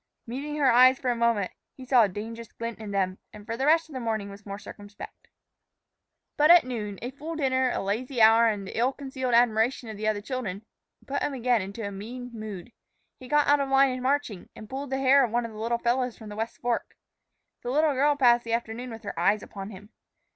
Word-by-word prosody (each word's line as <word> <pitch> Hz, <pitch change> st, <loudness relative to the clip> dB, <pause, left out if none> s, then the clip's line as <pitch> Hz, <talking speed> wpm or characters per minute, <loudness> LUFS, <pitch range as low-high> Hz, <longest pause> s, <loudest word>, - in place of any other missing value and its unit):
Meeting 275 Hz, +5 st, -5 dB
her 280 Hz, -3 st, +3 dB
eyes 255 Hz, +2 st, +6 dB
for 255 Hz, -2 st, -1 dB
a -, -, -1 dB
moment, 230 Hz, -5 st, +1 dB, 0.3 s
he 260 Hz, -, -10 dB
saw 250 Hz, -1 st, +5 dB
a 210 Hz, -, +3 dB
dangerous 225 Hz, +4 st, -7 dB
glint 230 Hz, -1 st, -6 dB
in 215 Hz, -2 st, -7 dB
them, 190 Hz, -2 st, -1 dB
and 210 Hz, -1 st, -12 dB
for 230 Hz, 0 st, -4 dB
the 265 Hz, +4 st, -1 dB
rest 325 Hz, +1 st, +4 dB
of 310 Hz, -, -14 dB
the 260 Hz, -, -4 dB
morning 220 Hz, -4 st, -3 dB
was 200 Hz, +1 st, -13 dB
more 200 Hz, 0 st, -5 dB
circumspect. 205 Hz, 0 st, -11 dB, 1.1 s
But 300 Hz, +1 st, +4 dB
at 350 Hz, 0 st, +9 dB
noon, 215 Hz, -6 st, -5 dB
a 245 Hz, -, -4 dB
full 305 Hz, +4 st, -7 dB
dinner, 260 Hz, -3 st, +1 dB
a -, -, -2 dB
lazy 240 Hz, +6 st, -2 dB
hour, 225 Hz, +1 st, +7 dB
and 205 Hz, -3 st, -1 dB
the -, -, -8 dB
ill 245 Hz, +4 st, +1 dB
concealed 260 Hz, -3 st, -2 dB
admiration 235 Hz, +1 st, +2 dB
of 215 Hz, -, -7 dB
the 215 Hz, +1 st, -3 dB
other 215 Hz, -1 st, +1 dB
children 215 Hz, -3 st, -5 dB, 0.4 s
put 280 Hz, -, -3 dB
him 285 Hz, -, -1 dB
again 245 Hz, -2 st, +2 dB
into 200 Hz, +3 st, -6 dB
a -, -, -6 dB
mean 245 Hz, +5 st, -8 dB
mood. 215 Hz, -2 st, -8 dB, 0.5 s
He 255 Hz, -, -11 dB
got 295 Hz, +2 st, +3 dB
out 290 Hz, 0 st, +4 dB
of 275 Hz, -1 st, -1 dB
line 270 Hz, 0 st, +4 dB
in 255 Hz, 0 st, -4 dB
marching, 260 Hz, -8 st, -1 dB
and 215 Hz, -, -10 dB
pulled 270 Hz, +4 st, -5 dB
the 265 Hz, -, -1 dB
hair 270 Hz, +1 st, +5 dB
of 245 Hz, -, 0 dB
one 240 Hz, +2 st, 0 dB
of 230 Hz, -, -7 dB
the 215 Hz, -, -10 dB
little 235 Hz, +2 st, 0 dB
fellows 245 Hz, +1 st, 0 dB
from 220 Hz, -2 st, -10 dB
the 205 Hz, -, -8 dB
West 225 Hz, +2 st, -4 dB
Fork. 240 Hz, -1 st, -2 dB, 0.7 s
The 245 Hz, -, -5 dB
little 300 Hz, +3 st, +2 dB
girl 285 Hz, +2 st, +3 dB
passed 240 Hz, -4 st, +4 dB
the 230 Hz, -, -3 dB
afternoon 235 Hz, +2 st, -3 dB
with 225 Hz, -1 st, -9 dB
her 200 Hz, -5 st, -5 dB
eyes 200 Hz, +4 st, +2 dB
upon 195 Hz, 0 st, -8 dB
him. 205 Hz, 0 st, -12 dB
235 Hz, 235 wpm, -27 LUFS, 215-260 Hz, 1.1 s, at